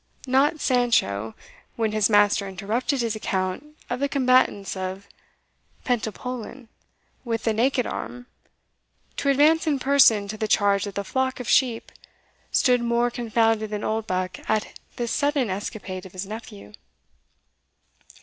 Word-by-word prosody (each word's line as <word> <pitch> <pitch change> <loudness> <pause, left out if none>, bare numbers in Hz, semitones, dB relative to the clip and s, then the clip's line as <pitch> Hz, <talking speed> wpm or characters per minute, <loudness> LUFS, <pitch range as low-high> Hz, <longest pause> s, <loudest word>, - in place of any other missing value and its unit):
Not 275 +4 +2
Sancho, 170 - +1 0.4
when 225 -2 0
his 215 -1 +2
master 205 -1 +3
interrupted 220 +8 -2
his 230 -2 -1
account 195 +9 -3
of 245 - -3
the 280 +1 0
combatants 255 -8 +2
of 190 +1 -5 0.8
Pentapolin 245 +1 -4 0.5
with 230 -2 -3
the 225 - +1
naked 250 +2 +1
arm, 245 0 -6 0.9
to 280 - 0
advance 305 +4 +4
in 295 -3 +2
person 260 -6 +4
to 215 - -5
the 215 - -2
charge 200 -1 +2
of 200 - -8
the 200 - -2
flock 260 +5 -1
of 250 - -6
sheep, 245 -4 +2 0.6
stood 250 -1 +3
more 235 +1 +1
confounded 225 -2 +1
than 210 0 -4
Oldbuck 185 -4 -2
at 220 0 0 0.2
this 235 -1 -3
sudden 285 -6 +1
escapade 190 -1 -5
of 185 - -19
his 185 +1 -5
nephew. 150 - -9
225 Hz, 135 wpm, -24 LUFS, 200-255 Hz, 0.9 s, advance